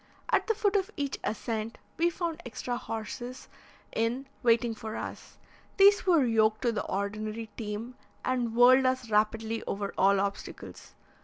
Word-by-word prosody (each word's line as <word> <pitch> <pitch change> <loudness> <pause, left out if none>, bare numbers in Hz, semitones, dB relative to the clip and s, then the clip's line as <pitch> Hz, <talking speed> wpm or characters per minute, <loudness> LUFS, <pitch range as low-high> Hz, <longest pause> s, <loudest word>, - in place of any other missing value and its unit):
At - - +2
the 445 - +2
foot 410 -1 +1
of 385 -2 +2
each 280 -2 -2
ascent 220 +1 -3 0.2
we 340 +1 +3
found 340 -1 -3
extra 245 0 -4
horses 240 +1 -6 0.5
in 235 +4 0 0.2
waiting 235 -1 +3
for 220 -1 -6
us; - - -7 0.4
these 400 0 +6
were 330 -7 +5
yoked 220 -1 +2
to 240 - +3
the 215 - -2
ordinary 215 +3 -3
team, 220 +2 -5 0.3
and 245 -3 0
whirled 255 +2 +7
us 255 -3 -1
rapidly 220 +2 +1
over 200 0 -3
all 195 +1 +5
obstacles. 200 0 -5
230 Hz, 150 wpm, -29 LUFS, 215-260 Hz, 0.5 s, whirled